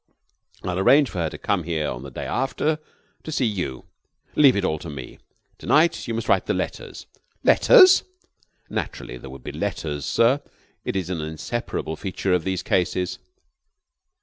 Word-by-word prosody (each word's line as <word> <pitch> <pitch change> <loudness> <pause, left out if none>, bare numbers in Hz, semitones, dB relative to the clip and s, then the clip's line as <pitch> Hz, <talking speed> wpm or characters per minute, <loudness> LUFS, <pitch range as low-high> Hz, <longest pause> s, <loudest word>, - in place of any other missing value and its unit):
I'll 90 0 -2
arrange 135 +7 +5
for 90 - -4
her 80 -2 0
to - - -8
come 100 -3 0
here 80 -2 -2
the 70 +2 -8
day 65 - -6
after 140 +4 -1 0.4
to 155 - -7
see 145 -4 +1
you. 90 - -3 0.5
Leave 140 -4 +6
it 100 -2 0
all 80 -3 0
to 85 - -8
me. 65 -4 -8 0.4
To - - -10
night 160 -1 +3
you 115 - -2
must 115 -1 -3
write - - +2
the - - +1
letters." - - -5 0.4
"Letters?" 375 0 +7 0.6
"Naturally, - - -5
there 65 - -10
would 65 -1 -11
be - - -5
letters, 75 -3 -3
sir. 125 +5 +3 0.4
It - - -3
is 95 -2 -2
an 85 -4 -2
inseparable 80 +1 -4
feature 95 -1 -2
of 90 -3 +1
these 95 -1 -1
cases." 90 0 0
90 Hz, 170 wpm, -23 LUFS, 80-120 Hz, 0.6 s, Letters